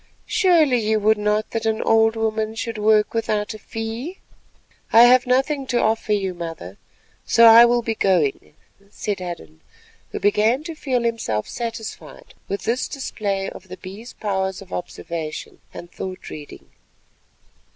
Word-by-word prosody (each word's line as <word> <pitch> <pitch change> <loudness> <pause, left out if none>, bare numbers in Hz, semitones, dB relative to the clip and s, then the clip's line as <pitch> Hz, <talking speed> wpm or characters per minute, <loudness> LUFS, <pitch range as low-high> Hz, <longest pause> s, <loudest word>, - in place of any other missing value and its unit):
"Surely 335 - +3
you 220 0 +1
would 215 +1 +3
not 210 +1 0
that 225 0 -2
an 220 0 0
old 225 0 +3
woman 220 0 -1
should 225 -1 -4
work 210 0 +3
without 215 -1 -1
a 215 - -10
fee?" 225 - -6 0.7
"I 230 - +8
have 250 +1 +6
none 270 +2 +1
to 245 -2 +1
offer 220 0 0
you, 195 -3 -1
mother, 165 - -8 0.4
so 230 - +5
I 230 +1 +10
will 240 0 +2
be 225 - -1
going," 170 -9 0 0.3
said 205 -1 -4
Hadden, 80 - -8 0.5
who - - -4
began 215 +7 +2
to 330 +1 -6
feel 260 -6 -1
himself 225 - -2
satisfied 230 -2 -7
with 200 - -4
this 240 +3 -1
display 200 -7 -3
of - - -12
the 185 0 -9
Bee's 200 +7 -10
powers 190 -2 -2
of 195 - -12
observation 165 -3 -6
and 175 - -10
thought 185 -1 -7
reading. 150 -1 -11
220 Hz, 150 wpm, -22 LUFS, 195-235 Hz, 0.7 s, I